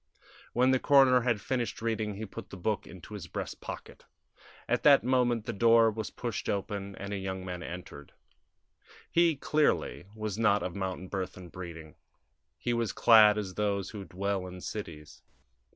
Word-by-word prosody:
When 125 Hz, +2 st, +4 dB
the 130 Hz, -, +3 dB
coroner 135 Hz, -3 st, +6 dB
had 120 Hz, -3 st, +1 dB
finished 120 Hz, +2 st, -2 dB
reading 110 Hz, -2 st, -2 dB
he 110 Hz, +2 st, -5 dB
put 95 Hz, -, -9 dB
the -, -, -9 dB
book 105 Hz, +3 st, -2 dB
into 95 Hz, +3 st, -11 dB
his 95 Hz, -5 st, -7 dB
breast -, -, -6 dB
pocket. -, -, -9 dB, 0.6 s
At 120 Hz, +1 st, +1 dB
that 140 Hz, -2 st, +6 dB
moment 120 Hz, -3 st, +2 dB
the -, -, -3 dB
door 115 Hz, +1 st, +5 dB
was 110 Hz, 0 st, -4 dB
pushed 120 Hz, -4 st, -4 dB
open 100 Hz, -1 st, -3 dB
and 100 Hz, +1 st, -6 dB
a -, -, -1 dB
young 95 Hz, -1 st, -4 dB
man 90 Hz, -1 st, -5 dB
entered. 85 Hz, -5 st, -8 dB, 1.0 s
He, 170 Hz, -2 st, +4 dB
clearly, 150 Hz, -8 st, 0 dB
was 110 Hz, -1 st, -4 dB
not 105 Hz, -2 st, +3 dB
of 90 Hz, -, -3 dB
mountain 95 Hz, -1 st, -4 dB
birth 95 Hz, -1 st, -4 dB
and 90 Hz, -3 st, -11 dB
breeding: 80 Hz, -4 st, -8 dB, 0.6 s
he 120 Hz, -, -1 dB
was 115 Hz, -2 st, -1 dB
clad 110 Hz, -2 st, +7 dB
as 100 Hz, -3 st, -3 dB
those 100 Hz, -1 st, -1 dB
who 105 Hz, -2 st, -7 dB
dwell 95 Hz, +1 st, -2 dB
in 90 Hz, 0 st, -9 dB
cities. 75 Hz, -9 st, -7 dB
105 Hz, 170 wpm, -30 LUFS, 95-115 Hz, 1.0 s, clad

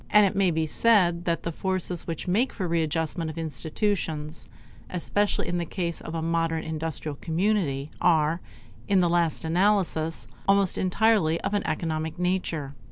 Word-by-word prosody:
And 210 Hz, -1 st, +6 dB
it 195 Hz, -, 0 dB
may 195 Hz, -2 st, +3 dB
be 160 Hz, -1 st, 0 dB
said 175 Hz, -2 st, +3 dB
that 170 Hz, -1 st, 0 dB
the 170 Hz, -, -2 dB
forces 185 Hz, 0 st, -1 dB
which 165 Hz, +1 st, -4 dB
make 220 Hz, +9 st, +2 dB
for 190 Hz, -, -3 dB
a -, -, -1 dB
readjustment 165 Hz, 0 st, -1 dB
of 155 Hz, -, -8 dB
institutions, 160 Hz, -, -2 dB, 0.4 s
especially 205 Hz, +3 st, 0 dB
in 175 Hz, 0 st, -1 dB
the -, -, -1 dB
case 170 Hz, -1 st, -3 dB
of 165 Hz, -, -6 dB
a 160 Hz, -, -2 dB
modern 165 Hz, -1 st, 0 dB
industrial 160 Hz, -2 st, -3 dB
community, 165 Hz, -5 st, 0 dB
are, 165 Hz, 0 st, +3 dB, 0.5 s
in 195 Hz, -1 st, +4 dB
the 175 Hz, -1 st, +3 dB
last 170 Hz, -2 st, +1 dB
analysis, 170 Hz, -, +1 dB, 0.2 s
almost 195 Hz, -2 st, +4 dB
entirely 185 Hz, -4 st, +2 dB
of -, -, -2 dB
an 205 Hz, -, +1 dB
economic 155 Hz, 0 st, -2 dB
nature. 175 Hz, -6 st, -1 dB
170 Hz, 165 wpm, -26 LUFS, 160-190 Hz, 0.5 s, And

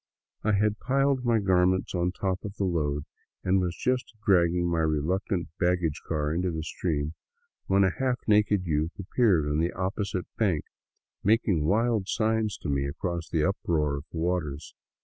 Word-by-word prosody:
I 110 Hz, -, +2 dB
had 105 Hz, +1 st, +1 dB
piled 135 Hz, 0 st, +1 dB
my 120 Hz, -2 st, +3 dB
gar 95 Hz, -3 st, +3 dB
ments 95 Hz, 0 st, 0 dB
on 90 Hz, 0 st, +1 dB
top 95 Hz, 0 st, -2 dB
of 105 Hz, -1 st, -6 dB
the -, -, -1 dB
load 75 Hz, -5 st, 0 dB, 0.4 s
and 95 Hz, +1 st, +3 dB
was 90 Hz, -1 st, -2 dB
just 125 Hz, -2 st, -1 dB
dragging 85 Hz, -2 st, +3 dB
my 85 Hz, -1 st, 0 dB
reluctant 80 Hz, +4 st, 0 dB
baggage 90 Hz, -3 st, +1 dB
car 75 Hz, -1 st, -1 dB
into 90 Hz, +2 st, 0 dB
the 80 Hz, -2 st, -3 dB
stream, 75 Hz, -2 st, -2 dB, 0.5 s
when 100 Hz, +1 st, +4 dB
a 95 Hz, -, +3 dB
half 130 Hz, -2 st, 0 dB
naked 105 Hz, -3 st, +3 dB
youth 80 Hz, +1 st, -1 dB
appeared 100 Hz, -5 st, +2 dB
on 75 Hz, +1 st, 0 dB
the 85 Hz, +2 st, +1 dB
opposite 95 Hz, 0 st, -2 dB
bank, 95 Hz, -9 st, +2 dB, 0.6 s
making 100 Hz, -7 st, +2 dB
wild 110 Hz, 0 st, +2 dB
signs 110 Hz, -1 st, 0 dB
to -, -, -3 dB
me 70 Hz, -1 st, 0 dB
across 85 Hz, +3 st, -4 dB
the 80 Hz, -2 st, +1 dB
uproar 75 Hz, -7 st, 0 dB
of 70 Hz, -, -8 dB
waters. 80 Hz, -3 st, -2 dB
90 Hz, 170 wpm, -27 LUFS, 80-105 Hz, 0.6 s, when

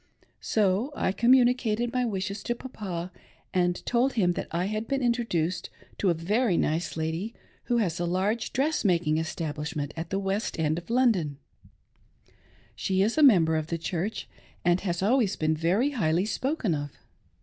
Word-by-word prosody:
Sol 210 Hz, +5 st, +1 dB, 0.2 s
communicated 240 Hz, -2 st, +3 dB
my 250 Hz, -1 st, +1 dB
wishes 200 Hz, -2 st, -3 dB
to 240 Hz, -, -2 dB
Papa, 190 Hz, -9 st, -6 dB, 0.4 s
and 180 Hz, -1 st, 0 dB
told 250 Hz, +3 st, +2 dB
him 185 Hz, -7 st, +2 dB
that -, -, -4 dB
I 170 Hz, +2 st, -1 dB
had 215 Hz, +2 st, -3 dB
been 275 Hz, -1 st, -1 dB
introduced 185 Hz, -8 st, 0 dB, 0.3 s
to 195 Hz, -, +2 dB
a 170 Hz, -, +2 dB
very 200 Hz, +4 st, +1 dB
nice 160 Hz, +1 st, -1 dB
lady, 165 Hz, +8 st, -3 dB, 0.3 s
who 240 Hz, -, +1 dB
has 180 Hz, -7 st, 0 dB
a 175 Hz, -, -1 dB
large 195 Hz, +6 st, 0 dB
dress 300 Hz, +4 st, 0 dB
making 170 Hz, -5 st, +2 dB
establishment 155 Hz, -2 st, -4 dB
at 165 Hz, +1 st, -5 dB
the 195 Hz, -, -1 dB
west 195 Hz, +2 st, -2 dB
end 160 Hz, 0 st, 0 dB
of 175 Hz, -, -17 dB
London; 220 Hz, -, +2 dB, 1.4 s
she 190 Hz, 0 st, +1 dB
is 220 Hz, +3 st, +1 dB
a 310 Hz, -, +2 dB
member 175 Hz, -, +6 dB
of 155 Hz, -1 st, -1 dB
the 170 Hz, -, -2 dB
Church, 180 Hz, +5 st, -3 dB, 0.4 s
and 175 Hz, +1 st, +3 dB
has 175 Hz, -2 st, -2 dB
always 220 Hz, -2 st, +2 dB
been 155 Hz, 0 st, +1 dB
very 185 Hz, -, +1 dB
highly 180 Hz, -, +1 dB
spoken 255 Hz, -, -1 dB
of. 145 Hz, -1 st, -3 dB
190 Hz, 160 wpm, -27 LUFS, 165-235 Hz, 1.4 s, member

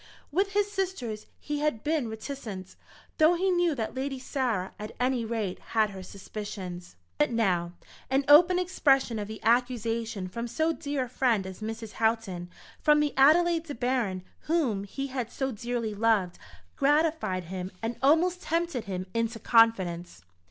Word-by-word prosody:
With 390 Hz, +6 st, +1 dB
his 410 Hz, 0 st, +1 dB
sisters 365 Hz, -, -3 dB
he 295 Hz, -1 st, -3 dB
had 295 Hz, -7 st, -1 dB
been 300 Hz, -6 st, 0 dB
reticent, 220 Hz, -5 st, -7 dB, 0.4 s
though 315 Hz, +3 st, +6 dB
he 375 Hz, +2 st, +1 dB
knew 350 Hz, -3 st, +2 dB
that 225 Hz, -4 st, -3 dB
Lady 270 Hz, +1 st, -3 dB
Sarah, 250 Hz, -8 st, -2 dB
at 210 Hz, +1 st, -7 dB
any 250 Hz, -1 st, +1 dB
rate, 220 Hz, -5 st, -3 dB, 0.2 s
had 215 Hz, -1 st, +4 dB
her 190 Hz, -1 st, -8 dB
suspicions. 185 Hz, -, -7 dB, 0.2 s
But 150 Hz, -, +4 dB
now 180 Hz, -7 st, 0 dB, 0.4 s
an 270 Hz, +1 st, +2 dB
open 345 Hz, +5 st, +7 dB
expression 275 Hz, -10 st, +2 dB
of 205 Hz, -, -4 dB
the 220 Hz, 0 st, -7 dB
accusation 230 Hz, -3 st, 0 dB
from 235 Hz, +6 st, -5 dB
so 315 Hz, +8 st, 0 dB
dear 285 Hz, -3 st, -2 dB
a -, -, -6 dB
friend 235 Hz, -5 st, +1 dB
as 190 Hz, +2 st, -8 dB
Mrs. 225 Hz, 0 st, -5 dB
Houghton, 220 Hz, -7 st, -1 dB, 0.3 s
from 300 Hz, 0 st, +5 dB
the 300 Hz, -1 st, +1 dB
Adelaide 330 Hz, +4 st, +5 dB
De 290 Hz, -, -6 dB
Baron 235 Hz, -7 st, -1 dB, 0.3 s
whom 250 Hz, -12 st, +1 dB
he 275 Hz, +7 st, -4 dB
had 255 Hz, -4 st, -4 dB
so 265 Hz, -1 st, -2 dB
dearly 235 Hz, -1 st, -3 dB
loved, 205 Hz, -4 st, +1 dB, 0.4 s
gratified 295 Hz, -, +1 dB
him 185 Hz, +2 st, -5 dB
and 230 Hz, +1 st, -2 dB
almost 340 Hz, +6 st, +3 dB
tempted 335 Hz, -8 st, -1 dB
him 185 Hz, -1 st, -4 dB
into 230 Hz, 0 st, -1 dB
confidence. 185 Hz, -, +2 dB
235 Hz, 160 wpm, -28 LUFS, 210-295 Hz, 0.4 s, open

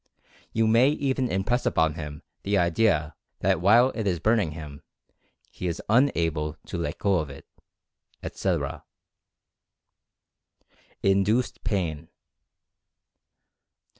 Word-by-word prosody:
You 115 Hz, 0 st, +1 dB
may 115 Hz, +5 st, +5 dB
even 135 Hz, -3 st, 0 dB
impress 110 Hz, +7 st, 0 dB
upon 80 Hz, -1 st, +2 dB
him 75 Hz, -2 st, -7 dB, 0.2 s
the 100 Hz, 0 st, 0 dB
idea 85 Hz, -3 st, +2 dB, 0.3 s
that -, -, +2 dB
while 120 Hz, +7 st, +5 dB
it 110 Hz, -3 st, -3 dB
is 90 Hz, -3 st, 0 dB
burn 110 Hz, +7 st, +3 dB
ing 85 Hz, -7 st, -1 dB
him, 75 Hz, -3 st, -9 dB, 0.7 s
he 90 Hz, -, -5 dB
is 85 Hz, -, -3 dB
unable 80 Hz, -, +2 dB
to -, -, -5 dB
let 75 Hz, -3 st, -3 dB
go 100 Hz, -3 st, +2 dB
of 75 Hz, -2 st, -4 dB
it, 70 Hz, -, -11 dB, 0.8 s
etc. -, -, -2 dB, 2.2 s
INDUCED 100 Hz, +5 st, +1 dB
PAIN. 85 Hz, -8 st, -2 dB
95 Hz, 110 wpm, -26 LUFS, 80-115 Hz, 2.2 s, may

